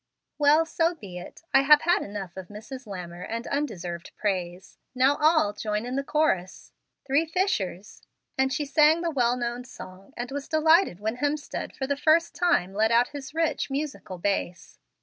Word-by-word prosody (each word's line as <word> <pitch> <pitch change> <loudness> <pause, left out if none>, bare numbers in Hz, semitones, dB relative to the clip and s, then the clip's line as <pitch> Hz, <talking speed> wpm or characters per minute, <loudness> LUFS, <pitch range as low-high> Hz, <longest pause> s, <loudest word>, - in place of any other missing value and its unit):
"Well, 300 +2 +5
so 330 +1 0
be 185 - -9
it. 180 - -12
I - - +7
have 295 +2 +6
had 350 +3 +3
enough 200 -3 -6
of 190 -2 -8
Mrs. 230 +5 -9
Lammer 180 -3 -7
and 230 +2 -4
undeserved 180 - -4
praise. 185 -2 -3 0.2
Now 265 +3 +4
all 310 -9 +3
join 210 +1 -3
in 250 +1 -4
the 275 - -1
chorus. 275 - -1 0.3
"Three 280 +3 +2
fishers 210 - -2 0.2
" - - -51
and 265 0 +1
she 295 - -1
sang 305 +3 +4
the 340 -1 -1
well 245 -4 +1
known 240 0 -3
song, 190 -6 -12
and 245 +2 -5
was 280 0 -5
delighted 315 - +3
when 220 +3 -3
Hemstead, 290 +2 -3
for 265 - -3
the 285 +1 0
first 315 +4 +3
time, 340 - +1
let 220 +2 +2
out 235 +1 +4
his 285 0 -9
rich, 325 -3 0
musical 275 -9 -4
bass. 185 -1 -3
255 Hz, 180 wpm, -26 LUFS, 200-300 Hz, 0.3 s, I